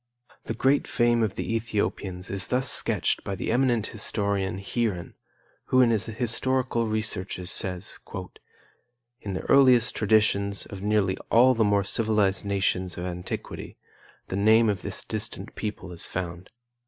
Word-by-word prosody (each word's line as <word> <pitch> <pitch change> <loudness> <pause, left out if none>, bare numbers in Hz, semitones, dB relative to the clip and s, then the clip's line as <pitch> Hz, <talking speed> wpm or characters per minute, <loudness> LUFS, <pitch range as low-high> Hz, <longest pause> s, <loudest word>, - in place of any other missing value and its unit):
The 115 - -3
great 135 +5 +2
fame 120 -1 +2
of 110 -4 0
the 115 - -2
Ethiopians 100 -4 -2
is 95 -1 +1
thus 130 +1 +1
sketched - - +2
by 100 - -4
the - - -3
eminent 120 -4 +2
historian, 100 -3 -1
Heeren, 100 -2 -3 0.5
who 130 - +2
in 120 -2 +4
his 110 0 +1
historical 120 +1 0
researches 105 -4 -2
says: 90 0 0 1.2
"In 100 - -5
the 95 - -4
earliest 130 -4 +5
traditions 100 -2 +2
of 100 -1 -9
nearly 105 -2 +1
all 125 +3 +6
the 115 -2 +2
more 100 -1 +2
civilized 105 -2 +1
nations 95 -2 -1
of 90 - -4
antiquity, 90 0 -6 0.5
the - - -4
name 110 +3 +4
of 100 -2 -1
this 100 -2 -4
distant 105 -1 -4
people 105 -4 -5
is 85 - -5
found. 90 0 -5
105 Hz, 145 wpm, -26 LUFS, 95-115 Hz, 1.2 s, all